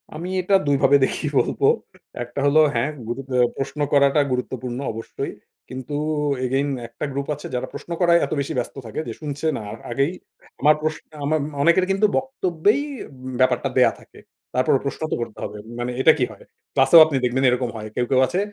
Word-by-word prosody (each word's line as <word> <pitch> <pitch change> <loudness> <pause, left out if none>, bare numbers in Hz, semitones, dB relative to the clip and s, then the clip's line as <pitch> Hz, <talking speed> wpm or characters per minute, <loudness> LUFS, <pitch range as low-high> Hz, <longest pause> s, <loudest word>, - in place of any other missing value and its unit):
আমি 170 +3 -5
এটা 185 +2 -1
২ 145 - +4
ভাবে 140 +1 +6
দেখি - - -3
বলবো - - 0 0.6
একটা 120 +3 -7
হলো 145 +2 +5 0.2
হ্যাঁ, 120 +5 +1 0.2
গ্রুপে 130 +2 -4
আ - - +1
প্রশ্ন 135 +2 -4
করাটা 140 +1 +5
গুরুত্বপূর্ণ 125 0 -3
অবশ্যই। 115 +1 -5 0.4
কিন্তু 130 +2 -7 0.5
এগেইন 135 +3 0 0.2
একটা 115 +5 -6
গ্রুপ 140 0 -3
আছে 150 - -8
যারা 125 +1 -2
প্রশ্ন - - -9
করায় 170 -1 +5
এত - - -10
বেশি 140 - -2
ব্যস্ত 125 - -3
থাকে 110 - -5
যে - - -4
শুনছে 145 0 -5
না। - - -5
আ - - -6 0.2
আগেই 135 +6 +1 0.5
আমার 150 +2 +6
প্রশ 155 0 -1 0.3
আমার 155 +1 +1 0.2
অনেকের 170 +5 +4
কিন্তু 195 +2 +3
বক্তব্যেই 210 - +1 0.6
ব্যাপারটা 130 - +2
দেয়া - - +6
থাকে। - - -17 0.3
তারপরও 130 +1 +3
প্রশ্ন 140 - -4
তো - - +2
করতে 115 -2 -6
হবে। 105 +1 -5 0.2
মানে 120 +1 -2
এটা 160 - +7
কি - - +2
হয়? - - -14 0.3
ক্লাসেও 135 +5 +8
আপনি 155 -3 -3
দেখবেন 125 +2 0
এরকম 125 0 0
হয়। 110 0 -6
কেউ, 125 - +1
কেউ, 130 - +3
আছে 180 - -1
140 Hz, 190 wpm, -22 LUFS, 125-155 Hz, 0.6 s, ক্লাসেও